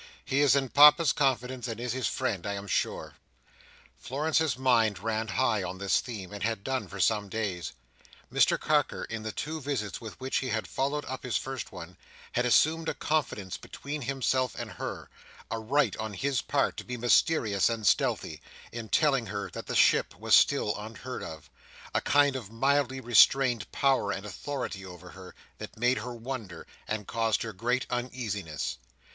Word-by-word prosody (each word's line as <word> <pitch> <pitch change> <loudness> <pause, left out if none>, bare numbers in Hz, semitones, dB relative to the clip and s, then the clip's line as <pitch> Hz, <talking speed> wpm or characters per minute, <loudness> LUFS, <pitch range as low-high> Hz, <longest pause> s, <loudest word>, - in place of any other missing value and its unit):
"He 135 - 0
is 140 -2 +5
in 135 -2 +1
Papa's 150 +2 +7
confidence, 130 -2 0
and 115 -1 -5
is 125 0 -2
his 130 0 -1
friend, 105 -8 -2
I 100 - -1
am 100 0 -5
sure." 100 - -2 0.9
Florence's 150 0 0
mind 115 -6 +3
ran 110 +3 -2
high 95 - +1
on 95 - -5
this 100 0 +2
theme, 105 -6 -7
and 105 - -7
had 110 -2 -1
done 130 -4 -2
for 100 +3 -9
some 105 +2 +2
days. 95 -5 -3 0.6
Mr - - +4
Carker, - - +1
in 115 -1 -5
the 110 0 -4
two 155 +7 -4
visits 125 -8 -3
with 110 -2 -9
which 130 0 -1
he 130 - -2
had 110 -1 -1
followed 145 +2 -2
up 130 0 -5
his 125 - -1
first 135 -2 -5
one, 90 -1 -10 0.3
had 125 +1 +1
assumed 160 +6 +3
a - - -3
confidence 120 - -2
between 145 +1 -7
himself 130 -1 0
and - - -5
her—a 115 - -8
right 120 -1 +1
on 110 -2 -4
his 135 +5 0
part 140 -1 0
to - - -5
be 125 0 -5
mysterious 115 - +3
and 115 -2 -3
stealthy, - - +1 0.3
in 115 -2 -7
telling 135 -7 +2
her 100 0 -4
that - - -7
the - - -3
ship - - +4
was - - -1
still 105 - +5
unheard 115 +4 -7
of—a 80 -2 -7
kind 145 -1 +3
of 115 -6 -6
mildly 135 +2 +1
restrained 120 -1 +4
power 135 -7 +2
and 100 +1 -4
authority 105 -1 -5
over 90 -1 -11
her—that 95 +3 -12
made 125 +1 +2
her 120 +3 -6
wonder, 115 -8 -6 0.2
and 110 -1 -3
caused 115 +2 0
her 110 -1 -5
great 120 +7 0
uneasiness. 110 - -3
120 Hz, 175 wpm, -29 LUFS, 105-135 Hz, 0.9 s, Papa's